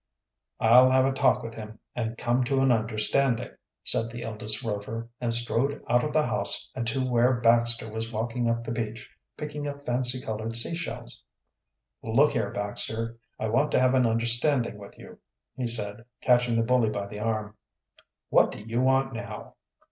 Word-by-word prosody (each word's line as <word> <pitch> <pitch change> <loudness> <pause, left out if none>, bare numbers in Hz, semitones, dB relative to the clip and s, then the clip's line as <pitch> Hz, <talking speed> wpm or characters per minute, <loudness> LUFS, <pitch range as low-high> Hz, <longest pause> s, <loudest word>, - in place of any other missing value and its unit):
"I'll 125 +3 +7
have 130 0 +4
a 135 - +2
talk 135 0 +2
with 115 - -6
him 110 0 -9 0.2
and 115 -1 -3
come 120 +2 +1
to 135 +2 +1
an 135 -1 +4
understanding," 115 +3 +1 0.3
said 115 - +2
the 120 +1 -7
eldest 110 +1 -2
Rover, 115 +1 -4
and 120 -1 -1
strode 120 +4 0
out 120 +1 +3
of 150 - -2
the 155 0 +2
house - - -2
and 115 -3 -3
to 130 +2 0
where 125 +1 +3
Baxter 115 -1 +3
was 110 +1 -5
walking 115 +2 -1
up 115 0 -1
the 115 - -5
beach, 110 -1 -5 0.2
picking 150 -1 -5
up 145 0 -7
fancy 125 +1 +1
colored 110 -1 -4
sea 115 +8 0
shells. 170 0 -6 0.8
"Look 135 +7 +3
here, 110 -4 -1
Baxter, 110 +3 -2 0.2
I 110 - -1
want 135 +7 +2
to - - +4
have 130 0 +3
an 130 -2 +4
understanding 120 +1 +2
with 100 -1 -12
you," - - -13 0.4
he 130 -2 -2
said, 105 -2 -1 0.2
catching 120 -1 +3
the 115 0 +2
bully 125 -2 +3
by 100 -2 -3
the 105 +1 -8
arm. 110 -1 -2 0.7
"What - - +4
do - - -8
you 115 +3 -2
want 135 0 +2
now?" 115 - -7
115 Hz, 180 wpm, -27 LUFS, 110-130 Hz, 0.8 s, I'll